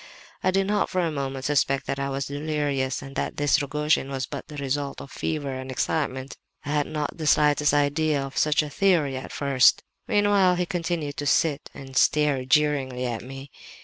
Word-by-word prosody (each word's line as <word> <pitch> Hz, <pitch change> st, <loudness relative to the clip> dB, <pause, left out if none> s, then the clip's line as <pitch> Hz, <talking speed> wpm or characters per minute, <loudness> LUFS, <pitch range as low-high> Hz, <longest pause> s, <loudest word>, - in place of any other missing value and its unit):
"I -, -, +3 dB
did 195 Hz, +1 st, +2 dB
not 205 Hz, +1 st, 0 dB
for 185 Hz, -, 0 dB
a 165 Hz, -2 st, 0 dB
moment 135 Hz, -2 st, -4 dB
suspect 135 Hz, -2 st, +1 dB
that 140 Hz, -, -3 dB
I 140 Hz, 0 st, -1 dB
was 135 Hz, 0 st, -2 dB
delirious 145 Hz, -3 st, -2 dB
and 135 Hz, 0 st, -10 dB
that -, -, -2 dB
this 145 Hz, +1 st, +3 dB
Rogojin 150 Hz, 0 st, 0 dB
was 135 Hz, -1 st, -3 dB
but -, -, -7 dB
the 150 Hz, -1 st, -9 dB
result 140 Hz, 0 st, -2 dB
of 135 Hz, -, -10 dB
fever 145 Hz, -4 st, -3 dB
and 130 Hz, 0 st, -6 dB
excitement. 130 Hz, 0 st, -2 dB, 0.3 s
I -, -, -5 dB
had 150 Hz, -1 st, +1 dB
not 150 Hz, -1 st, -3 dB
the 155 Hz, -, -2 dB
slightest 150 Hz, -1 st, +4 dB
idea 145 Hz, +1 st, +2 dB
of 135 Hz, -, -9 dB
such 150 Hz, 0 st, +2 dB
a 150 Hz, -, -6 dB
theory 160 Hz, -6 st, +2 dB
at 130 Hz, -, -6 dB
first. 140 Hz, -2 st, +3 dB, 0.2 s
"Meanwhile 205 Hz, -3 st, +3 dB
he 180 Hz, 0 st, 0 dB
continued 170 Hz, -5 st, -3 dB
to 145 Hz, -, -3 dB
sit 150 Hz, -2 st, +1 dB
and 135 Hz, -1 st, -10 dB
stare 145 Hz, -2 st, +3 dB
jeeringly 135 Hz, -3 st, +1 dB
at 120 Hz, -2 st, -3 dB
me. 135 Hz, +2 st, -10 dB
145 Hz, 195 wpm, -25 LUFS, 135-155 Hz, 0.3 s, slightest